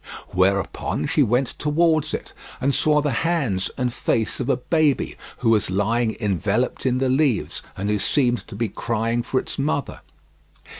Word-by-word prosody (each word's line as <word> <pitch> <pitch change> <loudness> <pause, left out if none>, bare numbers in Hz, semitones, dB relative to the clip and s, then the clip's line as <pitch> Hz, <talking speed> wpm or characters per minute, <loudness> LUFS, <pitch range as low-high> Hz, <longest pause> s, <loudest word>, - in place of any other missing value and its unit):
Whereupon 95 -4 0
she 150 - +2
went 125 +1 +2
towards 155 0 +2
it, - - -5 0.3
and 140 +2 +1
saw 150 +1 +3
the 145 -1 0
hands 140 - 0
and 125 -2 -1
face 115 -2 -1
of 125 - -2
a - - +3
baby 150 +1 +1 0.2
who 115 -2 +2
was 105 -4 +2
lying 110 +4 0
enveloped 105 +5 0
in 125 0 +2
the 135 +1 +1
leaves 130 -3 +1 0.2
and 100 +1 -2
who 105 0 +1
seemed 125 +1 +1
to 105 - -9
be 115 +2 -1
crying 115 +3 -1
for 130 +2 0
its - - -7
mother. 140 0 -1
120 Hz, 165 wpm, -23 LUFS, 105-140 Hz, 0.3 s, saw